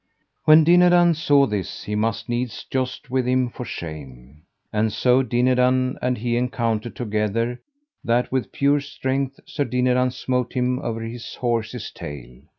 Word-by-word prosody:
When 155 Hz, +1 st, +8 dB
Dinadan 175 Hz, +1 st, +5 dB
saw 145 Hz, -3 st, +3 dB
this, 105 Hz, -6 st, -4 dB
he 105 Hz, -, -5 dB
must 110 Hz, +1 st, -1 dB
needs 120 Hz, -1 st, -3 dB
joust 130 Hz, 0 st, -4 dB
with 130 Hz, -1 st, 0 dB
him 125 Hz, -1 st, +1 dB
for 125 Hz, -, -7 dB
shame. 75 Hz, -, -9 dB, 0.3 s
And 110 Hz, +1 st, +1 dB
so 125 Hz, +4 st, +3 dB
Dinadan 125 Hz, +1 st, +2 dB
and 125 Hz, 0 st, 0 dB
he 120 Hz, +1 st, -1 dB
encountered 120 Hz, -2 st, -1 dB
together, 115 Hz, +1 st, -1 dB, 0.4 s
that 120 Hz, +1 st, +1 dB
with 130 Hz, -1 st, -1 dB
pure 140 Hz, +1 st, +2 dB
strength 135 Hz, -1 st, -3 dB
Sir 150 Hz, -, -2 dB
Dinadan 125 Hz, 0 st, +2 dB
smote 125 Hz, -1 st, -2 dB
him 125 Hz, 0 st, 0 dB
over 115 Hz, -5 st, -4 dB
his 115 Hz, +1 st, -7 dB
horse's 115 Hz, -1 st, -2 dB
tail. 65 Hz, -4 st, -9 dB
125 Hz, 150 wpm, -22 LUFS, 115-130 Hz, 0.4 s, When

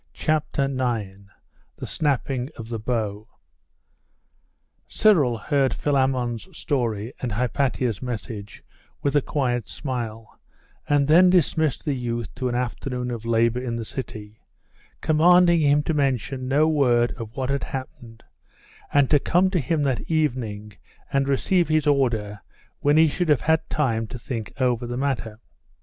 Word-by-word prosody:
CHAPTER 155 Hz, -2 st, 0 dB
IX: 115 Hz, -8 st, -3 dB, 0.5 s
THE -, -, -6 dB
SNAPPING 135 Hz, -3 st, -1 dB
OF 115 Hz, 0 st, -8 dB
THE 115 Hz, -2 st, -3 dB
BOW 110 Hz, -2 st, -3 dB, 1.6 s
Cyril 150 Hz, -, +3 dB
heard 135 Hz, +3 st, +1 dB
Philammon's 130 Hz, -2 st, 0 dB
story 115 Hz, -5 st, -2 dB
and 120 Hz, -5 st, -3 dB
Hypatia's 125 Hz, -1 st, -1 dB
message 110 Hz, -4 st, -6 dB, 0.4 s
with 140 Hz, 0 st, 0 dB
a 145 Hz, -, +5 dB
quiet 125 Hz, -5 st, -1 dB
smile, 115 Hz, -5 st, -5 dB, 0.5 s
and 145 Hz, -1 st, +3 dB
then 175 Hz, +4 st, +6 dB
dismissed 160 Hz, -4 st, +2 dB
the 150 Hz, -, 0 dB
youth 120 Hz, -3 st, -4 dB
to 125 Hz, 0 st, -2 dB
an 120 Hz, -, -2 dB
afternoon 125 Hz, 0 st, -3 dB
of 115 Hz, -2 st, -6 dB
labour 115 Hz, +1 st, +2 dB
in 120 Hz, -2 st, -3 dB
the 115 Hz, -1 st, -4 dB
city, 110 Hz, -4 st, -7 dB, 0.6 s
commanding 170 Hz, +2 st, +5 dB
him 145 Hz, 0 st, +3 dB
to 160 Hz, -, -1 dB
mention 135 Hz, -2 st, -1 dB
no 145 Hz, +4 st, +3 dB
word 125 Hz, -6 st, +3 dB
of 115 Hz, -1 st, -8 dB
what 130 Hz, 0 st, -1 dB
had 140 Hz, -, -1 dB
happened, 120 Hz, -3 st, -8 dB, 0.7 s
and 145 Hz, -2 st, +4 dB
to 145 Hz, -, +6 dB
come 180 Hz, +6 st, +2 dB
to 180 Hz, -, +1 dB
him 150 Hz, +2 st, 0 dB
that 135 Hz, -3 st, 0 dB
evening 120 Hz, -10 st, -1 dB, 0.4 s
and 135 Hz, 0 st, +2 dB
receive 170 Hz, +6 st, +2 dB
his 155 Hz, -1 st, +1 dB
order 115 Hz, -8 st, +1 dB, 0.4 s
when 145 Hz, +1 st, +3 dB
he 160 Hz, 0 st, +6 dB
should 170 Hz, +3 st, -1 dB
have 150 Hz, -, +4 dB
had 160 Hz, +1 st, +1 dB
time 115 Hz, -7 st, 0 dB
to 125 Hz, -, -7 dB
think 115 Hz, -2 st, -5 dB
over 125 Hz, -2 st, +1 dB
the 120 Hz, +1 st, -4 dB
matter. 115 Hz, -5 st, -2 dB
130 Hz, 145 wpm, -24 LUFS, 115-145 Hz, 1.6 s, then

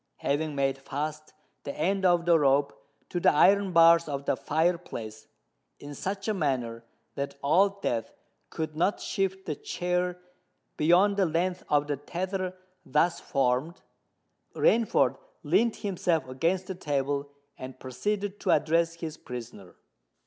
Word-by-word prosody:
Having 150 Hz, +1 st, -1 dB
made 135 Hz, -1 st, 0 dB
fast 150 Hz, +3 st, -5 dB, 0.3 s
the 140 Hz, -, -6 dB
end 195 Hz, +1 st, +1 dB
of 175 Hz, -2 st, +3 dB
the 170 Hz, -2 st, +5 dB
rope 140 Hz, -3 st, +3 dB, 0.4 s
to 175 Hz, -, -2 dB
the -, -, +5 dB
iron 195 Hz, +5 st, +4 dB
bars 165 Hz, -1 st, +6 dB
of 140 Hz, -1 st, -4 dB
the -, -, +1 dB
fire 165 Hz, +3 st, +1 dB
place, 110 Hz, -10 st, -8 dB, 0.5 s
in 145 Hz, 0 st, -9 dB
such 195 Hz, +7 st, -4 dB
a 215 Hz, -, +1 dB
manner 125 Hz, -, -2 dB, 0.3 s
that 140 Hz, 0 st, -4 dB
Old 195 Hz, +7 st, +3 dB
Death 115 Hz, -2 st, -1 dB, 0.4 s
could 155 Hz, -1 st, -4 dB
not 180 Hz, +6 st, +1 dB
shift 190 Hz, -1 st, -2 dB
the 155 Hz, -, -2 dB
chair 180 Hz, +3 st, -2 dB, 0.6 s
beyond 180 Hz, +6 st, +4 dB
the 195 Hz, -2 st, +3 dB
length 175 Hz, +3 st, -1 dB
of 145 Hz, -1 st, +3 dB
the 145 Hz, -1 st, -2 dB
tether 185 Hz, +5 st, -4 dB, 0.3 s
thus 150 Hz, +5 st, +1 dB
formed, 135 Hz, +5 st, -1 dB, 0.7 s
Rainford 230 Hz, 0 st, +3 dB, 0.2 s
leant 235 Hz, -1 st, +2 dB
himself 175 Hz, -6 st, -1 dB
against 165 Hz, +8 st, 0 dB
the 190 Hz, -, -5 dB
table 145 Hz, -4 st, -2 dB, 0.3 s
and 130 Hz, 0 st, -9 dB
proceeded 200 Hz, +11 st, -3 dB
to -, -, -3 dB
address 165 Hz, +2 st, +2 dB
his 160 Hz, -2 st, -6 dB
prisoner. 115 Hz, -6 st, -9 dB
165 Hz, 140 wpm, -28 LUFS, 140-185 Hz, 0.7 s, bars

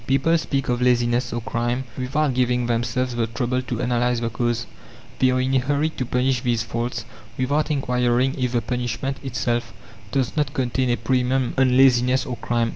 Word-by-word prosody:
People 135 Hz, +5 st, +3 dB
speak 135 Hz, -3 st, -2 dB
of 125 Hz, 0 st, 0 dB
laziness 120 Hz, 0 st, +2 dB
or 120 Hz, -, -3 dB
crime, 120 Hz, +2 st, -1 dB
without 135 Hz, +2 st, 0 dB
giving 125 Hz, -1 st, +1 dB
themselves 120 Hz, +2 st, -1 dB
the 115 Hz, -1 st, 0 dB
trouble 125 Hz, +2 st, -1 dB
to 125 Hz, -2 st, -4 dB
analyze 120 Hz, 0 st, +1 dB
the 115 Hz, 0 st, -2 dB
cause. 120 Hz, 0 st, -1 dB, 0.5 s
They 130 Hz, -, +4 dB
are 130 Hz, 0 st, +1 dB
in 130 Hz, +1 st, 0 dB
a 135 Hz, -, +4 dB
hurry 145 Hz, +4 st, 0 dB
to 130 Hz, -5 st, -5 dB
punish 125 Hz, 0 st, +1 dB
these 120 Hz, -2 st, 0 dB
faults 115 Hz, 0 st, -3 dB, 0.3 s
without 145 Hz, +4 st, 0 dB
inquiring 125 Hz, -2 st, +1 dB
if 125 Hz, -2 st, -1 dB
the 120 Hz, -, +2 dB
punishment 125 Hz, +2 st, -2 dB
itself 120 Hz, -2 st, -2 dB, 0.4 s
does 130 Hz, -2 st, 0 dB
not 145 Hz, -3 st, -1 dB
contain 130 Hz, 0 st, 0 dB
a 120 Hz, -, +2 dB
premium 125 Hz, +1 st, 0 dB
on 130 Hz, -1 st, +3 dB
"laziness" 130 Hz, 0 st, +4 dB
or 125 Hz, -3 st, -4 dB
"crime." 120 Hz, -1 st, 0 dB
125 Hz, 185 wpm, -23 LUFS, 120-130 Hz, 0.5 s, They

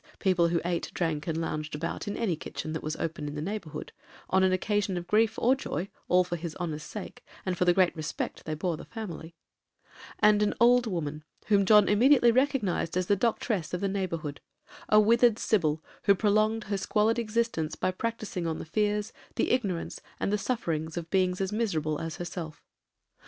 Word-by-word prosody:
people 180 Hz, -3 st, +3 dB
who 170 Hz, 0 st, +1 dB
ate, 175 Hz, -1 st, -1 dB
drank, 160 Hz, -3 st, -1 dB
and 165 Hz, -1 st, -1 dB
lounged 155 Hz, -2 st, -3 dB
about 165 Hz, +6 st, -4 dB
in 205 Hz, -, -3 dB
any 210 Hz, -8 st, 0 dB
kitchen 155 Hz, 0 st, -6 dB
that 160 Hz, -, -3 dB
was 155 Hz, 0 st, -3 dB
open 160 Hz, -2 st, -4 dB
in 145 Hz, -, -5 dB
the -, -, -3 dB
neighbourhood, 180 Hz, -1 st, -5 dB, 0.4 s
on 190 Hz, -, +4 dB
an 190 Hz, 0 st, +4 dB
occasion 200 Hz, 0 st, 0 dB
of 175 Hz, -, -4 dB
grief 220 Hz, +4 st, +2 dB
or 250 Hz, +3 st, +4 dB
joy, 185 Hz, -, -4 dB, 0.2 s
all 180 Hz, 0 st, +5 dB
for 175 Hz, -1 st, -4 dB
his 165 Hz, -1 st, -6 dB
honor's 160 Hz, -4 st, -4 dB
sake, 190 Hz, +6 st, -8 dB, 0.2 s
and 185 Hz, -1 st, 0 dB
for 180 Hz, -, +1 dB
the 175 Hz, -, +5 dB
great 185 Hz, -1 st, +3 dB
rispict 155 Hz, -2 st, -4 dB
they 155 Hz, -, -2 dB
bore 170 Hz, +2 st, -1 dB
the -, -, -9 dB
family), 170 Hz, -7 st, -7 dB, 0.8 s
and 210 Hz, 0 st, +5 dB
an 210 Hz, -, +1 dB
old 245 Hz, 0 st, +5 dB
woman, 155 Hz, -6 st, -3 dB, 0.3 s
whom 200 Hz, -2 st, +4 dB
John 210 Hz, 0 st, +7 dB
immediately 240 Hz, +3 st, +5 dB
recognized 240 Hz, -, +1 dB
as 185 Hz, -, +1 dB
the 205 Hz, -, +3 dB
doctress 205 Hz, -4 st, -1 dB
of 180 Hz, -, -5 dB
the 200 Hz, -, +1 dB
neighbourhood,—a 185 Hz, +2 st, -2 dB
withered 230 Hz, +1 st, +5 dB
Sybil, 160 Hz, -9 st, +1 dB, 0.2 s
who 200 Hz, -, +6 dB
prolonged 215 Hz, +2 st, +2 dB
her 200 Hz, 0 st, -2 dB
squalid 220 Hz, +4 st, +2 dB
existence 220 Hz, -8 st, -1 dB
by 185 Hz, -, 0 dB
practising 215 Hz, -4 st, -3 dB
on 160 Hz, -, -2 dB
the -, -, -6 dB
fears, 210 Hz, +4 st, 0 dB, 0.2 s
the -, -, +1 dB
ignorance, 200 Hz, -9 st, -1 dB, 0.2 s
and 200 Hz, -, 0 dB
the -, -, +3 dB
sufferings 160 Hz, -9 st, -2 dB
of 165 Hz, -1 st, -5 dB
beings 185 Hz, -1 st, +2 dB
as 190 Hz, 0 st, -1 dB
miserable 160 Hz, -9 st, -1 dB
as 165 Hz, -1 st, -4 dB
herself. 175 Hz, -3 st, -6 dB
185 Hz, 190 wpm, -28 LUFS, 165-215 Hz, 0.8 s, John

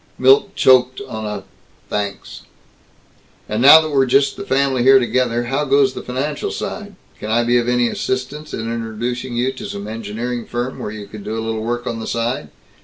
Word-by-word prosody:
Milt 135 Hz, +10 st, +4 dB
choked 130 Hz, 0 st, +4 dB
on 110 Hz, -1 st, -5 dB
a 105 Hz, -2 st, -5 dB, 0.4 s
"Thanks." 100 Hz, -1 st, -4 dB, 1.1 s
"And 110 Hz, +2 st, -2 dB
now 145 Hz, +5 st, +10 dB
that 155 Hz, -1 st, -4 dB
we're 135 Hz, -2 st, +3 dB
just 135 Hz, +2 st, +3 dB
the 200 Hz, -, -6 dB
family 135 Hz, -6 st, +1 dB
here 135 Hz, +2 st, +7 dB
together 120 Hz, -1 st, +1 dB
how 135 Hz, +5 st, -1 dB
goes 135 Hz, -1 st, +3 dB
the -, -, -6 dB
financial 140 Hz, +4 st, -3 dB
side? 205 Hz, -2 st, -6 dB, 0.2 s
Can 105 Hz, -, -6 dB
I 115 Hz, +2 st, +2 dB
be 120 Hz, +1 st, +3 dB
of 120 Hz, 0 st, -1 dB
any 125 Hz, -1 st, +2 dB
assistance 130 Hz, +6 st, -3 dB
in -, -, -4 dB
introducing 115 Hz, +2 st, -4 dB
you 125 Hz, +2 st, +1 dB
to 130 Hz, -, -8 dB
some 100 Hz, +1 st, -6 dB
engineering 115 Hz, +2 st, -5 dB
firm 120 Hz, +2 st, -4 dB
where -, -, -4 dB
you 105 Hz, -1 st, -7 dB
could 105 Hz, 0 st, -10 dB
do 110 Hz, +2 st, -4 dB
a 110 Hz, -, -3 dB
little 110 Hz, -1 st, -2 dB
work 120 Hz, +2 st, -3 dB
on 115 Hz, -2 st, -3 dB
the 110 Hz, -, -6 dB
side? 115 Hz, -9 st, -2 dB
120 Hz, 195 wpm, -19 LUFS, 115-130 Hz, 1.1 s, now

